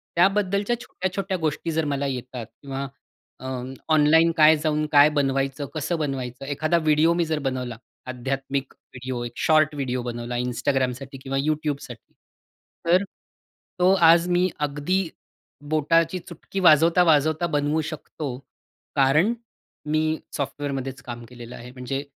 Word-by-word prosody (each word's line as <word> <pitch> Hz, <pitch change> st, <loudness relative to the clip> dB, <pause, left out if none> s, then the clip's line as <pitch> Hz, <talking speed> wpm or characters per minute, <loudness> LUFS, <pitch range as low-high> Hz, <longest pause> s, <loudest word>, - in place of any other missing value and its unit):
त्याबद्दलच्या 200 Hz, +5 st, +2 dB
छोट्या-छोट्या 190 Hz, -2 st, -3 dB
गोष्टी 160 Hz, 0 st, -2 dB
जर 160 Hz, 0 st, 0 dB
मला 140 Hz, 0 st, -1 dB
येतात 125 Hz, -2 st, -5 dB, 0.2 s
किंवा 140 Hz, -1 st, -4 dB, 0.5 s
अ, 130 Hz, -, -7 dB, 0.5 s
ऑनलाईन 160 Hz, +2 st, +5 dB
काय 155 Hz, 0 st, +7 dB
जाऊन, 155 Hz, 0 st, 0 dB
काय 145 Hz, 0 st, +7 dB
बनवायचं? 135 Hz, -1 st, 0 dB
कसं 155 Hz, +3 st, -1 dB
बनवायचं? 135 Hz, -3 st, -4 dB
एखादा 155 Hz, +4 st, 0 dB
व्हिडिओ 155 Hz, +1 st, +3 dB
मी 170 Hz, 0 st, +1 dB
जर 160 Hz, -1 st, -1 dB
बनवला. 125 Hz, -3 st, -5 dB, 0.3 s
आध्यात्मिक 135 Hz, +2 st, -3 dB
व्हिडिओ, 125 Hz, -1 st, -7 dB
एक 120 Hz, -, -5 dB
शॉर्ट 155 Hz, -1 st, +3 dB
व्हिडिओ 130 Hz, -3 st, -2 dB
बनवला 120 Hz, 0 st, -4 dB
Instgramसाठी 130 Hz, +1 st, -1 dB
किंवा 135 Hz, 0 st, -2 dB
YouTubeसाठी. 145 Hz, -4 st, -3 dB, 0.7 s
तर 180 Hz, +3 st, +4 dB, 0.8 s
तो 180 Hz, +1 st, +5 dB, 0.2 s
आज 170 Hz, +1 st, +5 dB
मी 180 Hz, +1 st, +3 dB, 0.2 s
अगदी 150 Hz, +6 st, -1 dB, 0.7 s
बोटाची 165 Hz, +3 st, +2 dB
चुटकी 175 Hz, +2 st, -7 dB
वाजवता-वाजवता 160 Hz, -1 st, +4 dB
बनवू 145 Hz, +2 st, +1 dB
शकतो. 155 Hz, -1 st, -6 dB, 0.7 s
कारण 150 Hz, -, +4 dB, 0.5 s
मी 155 Hz, +1 st, +1 dB, 0.3 s
सॉफ्टवेअरमध्येच 135 Hz, -2 st, -4 dB
काम 120 Hz, -1 st, -7 dB
केलेलं 120 Hz, -1 st, -10 dB
आहे. 120 Hz, +1 st, -10 dB
म्हणजे 130 Hz, +2 st, -4 dB
145 Hz, 125 wpm, -24 LUFS, 135-165 Hz, 0.8 s, काय